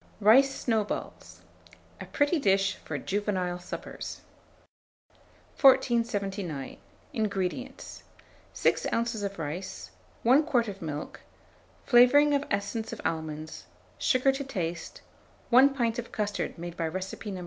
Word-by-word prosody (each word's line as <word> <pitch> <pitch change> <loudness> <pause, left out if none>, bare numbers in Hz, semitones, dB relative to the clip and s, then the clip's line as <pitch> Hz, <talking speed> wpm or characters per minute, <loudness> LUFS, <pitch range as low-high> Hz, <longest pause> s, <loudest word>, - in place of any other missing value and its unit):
RICE 235 +7 +6
SNOWBALLS. 220 -4 -3 0.6
(A - - -5
pretty 290 +3 +1
dish 195 -4 +2
for 145 - -5
Juvenile 185 0 -2
Suppers.) 180 - -7 1.4
1479. 205 - +2 0.4
INGREDIENTS. 215 +4 -3 0.5
6 - - +1
oz. 230 -2 -1
of 200 -1 -4
rice, 165 +4 -6 0.3
1 260 +6 +5
quart 250 -7 +1
of 195 -1 -7
milk, 150 -2 -5 0.7
flavouring 280 +4 +6
of 285 0 +2
essence 200 +3 -2
of - - -7
almonds, 155 -1 -4 0.3
sugar 265 -1 +3
to 270 +1 -4
taste, 175 -10 -5 0.5
1 260 +3 +8
pint 235 -3 0
of 235 - -7
custard 205 -1 -3
made 170 0 -7
by 165 - -2
recipe 190 +5 -5
No. 190 -2 -5
205 Hz, 115 wpm, -28 LUFS, 180-245 Hz, 1.4 s, 1